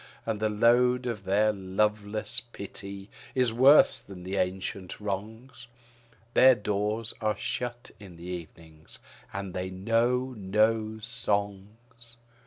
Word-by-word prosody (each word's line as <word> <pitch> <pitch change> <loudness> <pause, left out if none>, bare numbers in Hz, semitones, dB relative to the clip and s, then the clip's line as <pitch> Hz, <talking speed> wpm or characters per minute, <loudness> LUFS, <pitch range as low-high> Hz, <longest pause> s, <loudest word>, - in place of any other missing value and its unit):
And 110 -2 -2
the 110 0 +1
load 125 +3 +3
of 110 -5 -4
their 105 +3 +3
loveless 105 +4 0
pity 100 -4 -8 0.3
is 125 -3 +2
worse 135 +5 +6
than 95 -2 -11
the 95 +2 -4
ancient 95 0 -3
wrongs, 110 +6 -6 0.7
Their 130 0 +7
doors 105 +1 -2
are 105 -2 0
shut 120 +1 -4
in 95 -4 -12
the 85 - -11
evening; 80 -3 -9 0.4
and 95 -1 -5
they 90 0 -3
know 115 +7 0
no 110 +2 +1
songs. 115 +1 -4
105 Hz, 120 wpm, -28 LUFS, 95-115 Hz, 0.7 s, Their